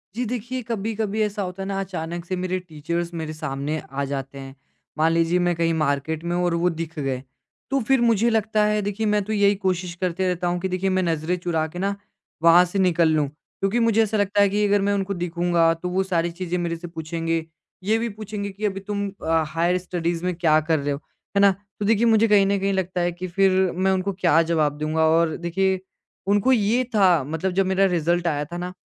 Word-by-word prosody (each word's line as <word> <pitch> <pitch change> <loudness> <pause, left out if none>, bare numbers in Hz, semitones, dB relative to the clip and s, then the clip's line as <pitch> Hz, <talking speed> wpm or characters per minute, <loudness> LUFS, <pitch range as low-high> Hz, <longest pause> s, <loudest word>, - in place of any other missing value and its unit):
जी 250 - -1
देखिए 245 +2 -4
कभी-कभी 220 -1 -2
ऐसा 210 0 -2
होता 185 0 -5
है 195 - -5
ना 195 -1 -2
अचानक 175 -2 -5
से 185 - -3
मेरे 185 0 -2
टीचर्स 170 +1 -4
मेरे 160 -2 -4
सामने 150 0 -3
आ 140 +1 -2
जाते 135 0 -5
हैं 135 0 -9 0.4
मान 160 +1 +3
लीजिए 165 +2 +2
मैं 175 0 +1
कहीं 165 0 +1
मार्केट 155 +1 -1
में 175 0 -2
हूँ 180 - 0
और 175 - +1
वो 180 - +4
दिख 165 -1 -6
गए 135 -3 -2 0.5
तो 275 0 +1
फ़िर 270 -2 +3
मुझे 230 0 +3
लगता 220 -1 +1
है 210 0 +1
देखिए 205 +2 -2
मैं 210 0 +2
तो 215 - -3
यही 205 -1 +3
कोशिश 185 -2 -2
करते 185 +1 0
रहता 180 0 -1
हूँ 175 0 0
कि 190 - -2
देखिए 185 +1 -1
मैं 185 0 +1
नज़रें 165 +1 0
चुरा 170 -3 -1
के 175 +3 -8
ना 200 +1 -1 0.5
वहाँ 170 +2 +7
से 195 +3 -3
निकल 170 -3 +3
लूँ। 155 -2 +2
क्योंकि 195 +8 -3
मुझे 225 -1 +3
ऐसा 215 0 -1
लगता 205 0 +2
है 200 - +5
कि 210 +1 +1
अगर 205 0 +3
मैं 200 +1 +1
उनको 200 0 -1
दिखूँगा 170 -1 +1
तो 170 +2 -5
वो 185 +2 +1
सारी 175 -2 0
चीज़ें 180 0 -3
मेरे 170 -1 -2
से 175 +1 -8
पूछेंगे। 165 0 -3 0.4
ये 215 +3 +2
भी 235 0 -2
पूछेंगे 210 -1 -5
कि 200 +2 -5
अभी 195 -1 -1
तुम 200 0 -3 0.2
अ, 160 0 +2
हायर 170 +3 +1
स्टडीज़ 175 -1 -3
में 180 - 0
क्या 160 -2 +3
कर 155 0 +1
रहे 145 +1 -2
हो, 140 - -2 0.4
है - - +4
ना? 200 -1 +7 0.3
तो 205 - -1
देखिए 225 +2 +3
मुझे 225 -1 +4
कहीं 205 -2 +5
ना 200 +1 +1
कहीं 195 0 0
लगता 185 -1 -1
है 175 - +1
कि 175 +2 -6
फ़िर 190 0 +2
मैं 190 +2 +2
उनको 190 +1 0
क्या 175 -3 +3
जवाब 150 -3 +1
दूँगा। 155 +1 +1
और 165 0 +2
देखिए 190 +2 0 0.5
उनको 205 +5 +3
ये 235 +1 +3
था 180 -7 +4
मतलब 160 +7 -2
जब 195 +1 +1
मेरा 190 +1 +2
रिजल्ट 170 +1 +1
आया 150 -2 0
था 175 +3 -7
ना 180 +1 -5
180 Hz, 230 wpm, -23 LUFS, 165-200 Hz, 0.5 s, वहाँ